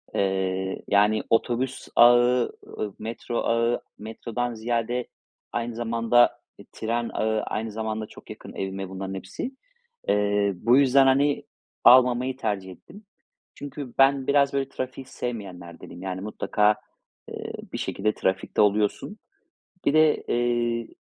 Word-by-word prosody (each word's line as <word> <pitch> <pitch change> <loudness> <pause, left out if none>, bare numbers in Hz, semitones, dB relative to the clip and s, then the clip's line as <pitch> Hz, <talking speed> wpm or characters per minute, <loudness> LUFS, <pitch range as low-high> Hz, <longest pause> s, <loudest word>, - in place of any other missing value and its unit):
Eee, 95 -1 -1
yani, 105 +2 +3
otobüs 125 +3 0
ağı, 120 +1 +5 0.2
ııı, 105 -2 -5
metro 115 +2 -5
ağı, 115 +1 +1 0.2
metrodan 115 +2 -4
ziyade 120 +2 -2 0.4
aynı 120 0 -3
zamanda, 115 +1 +2 0.2
eee, - - -14
tren 115 +1 -2
ağı, 110 0 0
aynı 110 0 -3
zamanda 110 0 -3
çok - - -15
yakın - - -10
evime 95 0 -4
bunların 95 0 -5
hepsi. 95 - -6 0.6
Eee, 105 -1 +2
bu 120 +8 +3
yüzden, 135 0 +5
hani, 140 +2 +2 0.4
almamayı 125 +1 +5
tercih 95 -6 -3
ettim. 200 - -15 0.5
Çünkü 140 -3 -7
ben 135 0 +4
biraz, 140 -1 +3
böyle, 135 -1 -1
trafiği 130 +1 -6
sevmeyenlerdenim. 90 -9 -7
Yani, 95 -1 -4
mutlaka, 105 0 +1 0.5
eee, - - -6 0.2
bir - - -2
şekilde 105 +2 -1
trafikte 95 0 0
oluyorsun. 105 - +1 0.7
Bir 140 - +2
de, 155 -1 +5
eee, 120 -1 0
115 Hz, 125 wpm, -25 LUFS, 105-125 Hz, 0.7 s, ağı